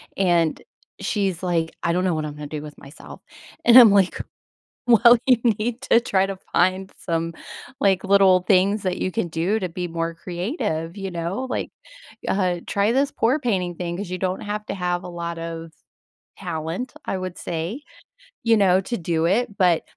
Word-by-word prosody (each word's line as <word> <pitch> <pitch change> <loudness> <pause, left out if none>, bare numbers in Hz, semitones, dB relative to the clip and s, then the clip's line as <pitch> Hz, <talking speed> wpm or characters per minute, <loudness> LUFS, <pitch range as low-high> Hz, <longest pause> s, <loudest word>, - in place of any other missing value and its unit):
and 175 -4 +1 0.4
she's 195 -5 -1
like, 170 -3 -1
"I 170 - +1
don't 180 +2 0
know 185 - +1
what 155 -1 -2
I'm 150 - -6
gonna 150 0 -7
do 150 0 -5
with 150 -1 -10
myself." 140 +3 -13 0.4
And 240 +1 +8
I'm 235 -4 +9
like, 195 -2 +2 0.6
"Well, 240 0 +7
you 255 -3 +5 0.2
need 240 +3 -2
to 235 - +4
try 195 -5 +1
to 195 -1 -5 0.2
find 185 +2 +1
some, 165 -1 -2 0.5
like, 195 -5 +2
little 195 -2 +5
things 195 +2 +2
that 185 -1 -1
you 185 - -1
can 185 -5 -2
do 170 +7 0
to 185 - -2
be 175 +1 -4
more 165 0 -3
creative." 170 - -4
You 195 -1 -4
know? 175 +9 -3
Like, - - -3 0.6
uh, 180 -3 0
"Try 200 +2 +1
this 275 +2 +1
pour 250 +6 +1
painting 185 - -1
thing." 175 0 -4
'Cause 200 -2 -6
you 185 - -3
don't 185 0 -2
have 210 0 -4
to - - -4
have 180 -1 -2
a - - -7
lot 170 -1 -5
of 165 0 -6 0.7
talent, 170 - -4
I 195 - -2
would 185 -1 -5
say, 175 - -4 0.6
you 230 -1 +4
know, 190 -2 +4
to 235 +5 -4
do 165 -2 -1
it, 205 +4 0
but 175 -3 +3
185 Hz, 185 wpm, -23 LUFS, 170-205 Hz, 0.7 s, I'm